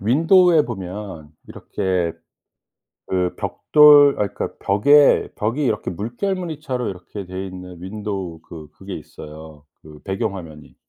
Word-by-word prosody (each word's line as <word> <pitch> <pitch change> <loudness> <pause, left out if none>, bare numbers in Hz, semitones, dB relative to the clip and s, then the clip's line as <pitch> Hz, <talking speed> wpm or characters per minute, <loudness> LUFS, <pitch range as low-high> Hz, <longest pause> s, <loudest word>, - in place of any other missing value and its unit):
윈도우에 165 - +4
보면 95 -7 -7 0.2
이렇게 90 -3 -2 0.9
그 90 -1 -1
벽돌 145 -2 +5
아 105 - +1
그러니까 - - -5
벽에 140 +9 +4
벽이 115 +8 -2
이렇게 110 -7 -1
물결무늬처럼 140 - -4
이렇게 95 +1 -8
돼 95 +1 -6
있는 90 -2 -10
윈도우 95 -3 -5
그 80 -2 -11
그게 95 +5 -9
있어요 75 -1 -12 0.2
그 75 -1 -14
배경 95 0 -3
화면이. 80 -5 -11
95 Hz, 280 characters per minute, -21 LUFS, 90-130 Hz, 0.9 s, 벽돌